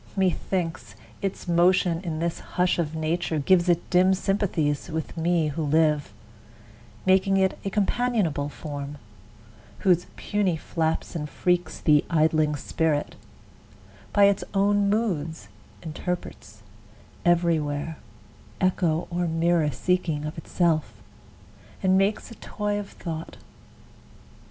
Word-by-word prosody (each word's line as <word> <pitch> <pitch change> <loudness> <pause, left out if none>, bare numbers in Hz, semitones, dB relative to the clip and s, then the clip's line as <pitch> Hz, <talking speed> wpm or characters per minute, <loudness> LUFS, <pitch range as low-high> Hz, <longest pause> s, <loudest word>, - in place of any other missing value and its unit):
Methinks, 165 - -1 0.3
its 195 -1 -4
motion 175 0 +3
in 165 -3 -3
this 170 +1 -2
hush 180 -1 0
of 160 -2 -1
nature 160 +1 -1
Gives 175 +4 +3
it 175 -1 +2
dim 185 +1 +5
sympathies 175 -8 0
with 160 0 -4
me 165 -1 +1
who 150 +3 -4
live, 150 -1 +2 0.9
Making 190 +1 +4
it 190 0 +1
a 195 - -2
companionable 205 -8 0
form, 145 -1 -6 0.8
Whose 180 -3 +3
puny 200 -5 0
flaps 160 +1 -2
and 150 -2 -3
freaks 180 +2 0
the 150 -2 +4
idling 155 -2 +2
Spirit 150 +1 -1 1.0
By 205 - +4
its 200 0 +4
own 200 +1 +3
moods 165 - -1 0.3
interprets, 155 - -6 0.6
every 170 -1 +3
where 145 +2 -3 0.6
Echo 175 -3 +1
or 175 0 0
mirror 165 -1 +2
seeking 160 +1 -1
of 150 - -5
itself, 160 -1 0 0.9
And 190 0 +4
makes 195 +4 +1
a - - -9
toy 205 0 -2
of 205 - -7
Thought. 165 -2 -7
170 Hz, 120 wpm, -25 LUFS, 155-185 Hz, 1.0 s, dim